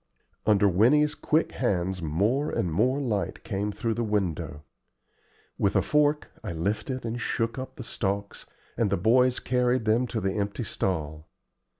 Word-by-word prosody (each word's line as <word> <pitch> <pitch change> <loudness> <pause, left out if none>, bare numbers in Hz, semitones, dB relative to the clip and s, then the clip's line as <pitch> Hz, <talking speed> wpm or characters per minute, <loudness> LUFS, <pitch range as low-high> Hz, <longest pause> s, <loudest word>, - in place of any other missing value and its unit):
Under 105 -1 +5
Winnie's 130 +11 +4
quick 155 +2 +1
hands 95 -6 -1
more 105 - +1
and 90 - -1
more 125 - +2
light 110 -8 -2
came 100 +1 -2
through 110 +3 -2
the 120 - -2
window. 95 -8 -2 1.0
With 100 - +1
a - - +4
fork 150 0 +2
I 100 - -4
lifted 105 - -2
and 115 +1 -3
shook 115 +2 -1
up 130 - -7
the 125 - -7
stalks, 100 -2 -3 0.3
and 115 -3 +1
the 100 - +1
boys 125 +6 +3
carried 125 -1 +1
them 115 +3 +2
to 115 - -2
the 95 -2 -1
empty 100 +3 -2
stall. 80 -7 -3
110 Hz, 160 wpm, -27 LUFS, 95-125 Hz, 1.0 s, Under